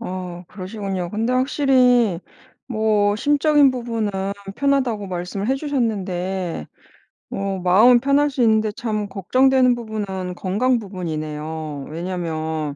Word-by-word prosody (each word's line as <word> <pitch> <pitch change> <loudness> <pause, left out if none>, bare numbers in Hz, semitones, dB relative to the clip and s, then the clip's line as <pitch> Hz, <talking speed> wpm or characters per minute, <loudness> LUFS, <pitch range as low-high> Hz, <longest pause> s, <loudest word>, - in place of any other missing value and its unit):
어 180 -4 -6
그러시군요. 190 -2 -5
근데 225 +4 -1
확실히 250 - +3 0.5
뭐 215 -3 +1
심적인 290 +1 +4
부분은 230 -4 -2 0.5
편하다고 260 -7 +1
말씀을 185 +4 -4
해 265 - +3
주셨는데 190 - -2 0.6
뭐 195 -1 -3
마음은 215 +8 +6
편할 280 +3 +2
수 265 -2 -3
있는데 220 -1 +3
참 215 -2 -3
걱정되는 255 +6 +3
부분은 200 -6 -5
건강 230 +8 +1
부분이네요. 155 -6 -5
왜냐하면 160 -3 -3
205 Hz, 280 characters per minute, -21 LUFS, 180-250 Hz, 0.6 s, 마음은